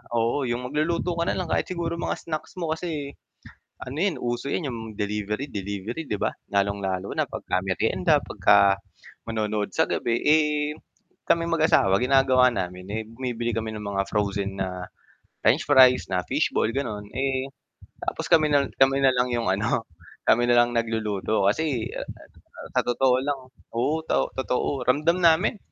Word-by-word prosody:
oo, 115 +5 +1
'yung 120 +1 -2
magluluto 170 +3 0
ka 170 - +1
na - - 0
lang 180 -3 -3
kahit - - +1
siguro 170 -2 -2
mga - - -1
snacks 155 +2 -6
mo 165 -2 -2
kasi 155 -4 -5 0.7
ano 130 +3 -7
'yan, 185 -7 +1
uso 120 +1 -2
'yan 150 -6 -1
'yung 115 -2 -5 0.2
delivery-delivery, 105 +3 -3
'di - - -3
ba? - - +2 0.2
Lalong-lalo 100 -1 -1
na - - +2
'pagka 90 - -2
meryenda, 95 -1 +2
'pagka 100 -1 +4 0.5
manonood 105 -2 -2
sa - - +3
gabi, 120 0 0
eh, 150 -1 +2 0.5
kaming 170 0 +2
mag-asawa 155 -12 +4
ginagawa 130 -1 +4
namin, 90 -2 -4
eh, 110 - -1
bumibili 120 -1 -3
kami 110 -1 -3
ng 105 - -6
mga 100 -1 -1
frozen 100 -1 -1
na 90 -1 -4 0.6
french - - +3
fries, 130 -3 +6
na 90 - +2
fish - - +1
ball, - - +2
gano'n. 110 -7 -4
Eh, 135 0 -1 0.6
tapos, - - -3
kami 155 -2 +5
na 140 -1 +4 0.2
kami 135 +1 +5
na 130 -1 +5
lang 125 0 +1
'yung, 120 -1 -1
ano, 110 +3 0 0.4
kami 120 +2 +5
na 120 0 +6
lang 120 0 +1
nagluluto 110 -3 0
kasi 130 -1 -1
a - - -3
a - - -11 0.5
sa - - +4
totoo 125 +1 +3
lang 145 0 -1 0.4
oo, 150 +7 +1
to - - +1
totoo 130 0 -1
ramdam 160 +7 +2
namin. 170 +6 +3
120 Hz, 165 wpm, -25 LUFS, 105-145 Hz, 0.7 s, fries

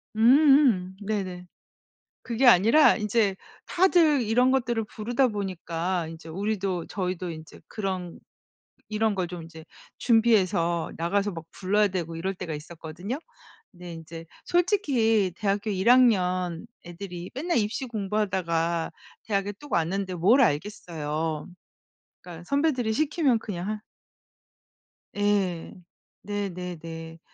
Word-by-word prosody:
음음음. 245 -6 +5
네네. 190 -4 -4 0.8
그게 245 +2 0
아니라 230 - +6
인제 210 -2 +1 0.3
다들 340 -6 +4
이런 240 +3 +3
것들을 240 -4 0
부르다 240 +5 0
보니까 180 -4 -3
인제 165 0 -10
우리도 195 -1 -2
저희도 180 -2 -3
인제 155 0 -10
그런 185 -4 -4 0.7
이런 215 -1 +1
걸 180 -2 -1
좀 175 -2 -7
인제 160 0 -12 0.3
준비해서 190 -8 +2
나가서 200 +5 0
막 165 -1 -8
불러야 205 +2 +2
되고 170 -3 -4
이럴 190 +4 -3
때가 165 -3 -5
있었거든요. 165 - -6 0.5
근데 175 -2 -10
인제 165 0 -9 0.2
솔직히 260 - +2
대학교 205 0 -1
1 190 +4 +1
학년 185 -7 +3 0.2
애들이 175 0 -8
맨날 335 +7 -1
입시 220 +4 -1
공부하다가 190 -6 -1 0.3
대학에 200 -1 -1
뚝 290 +8 -14
왔는데 185 +3 0
뭘 210 +11 +4
알겠어요. 155 - -2 0.7
그러니까 175 -1 -10
선배들이 280 - +1
시키면 295 -3 +2
그냥 195 -3 -5
하 215 0 -4 1.3
예. 200 -4 0 0.5
네네네. 175 -5 -6
195 Hz, 260 characters per minute, -26 LUFS, 170-225 Hz, 1.3 s, 아니라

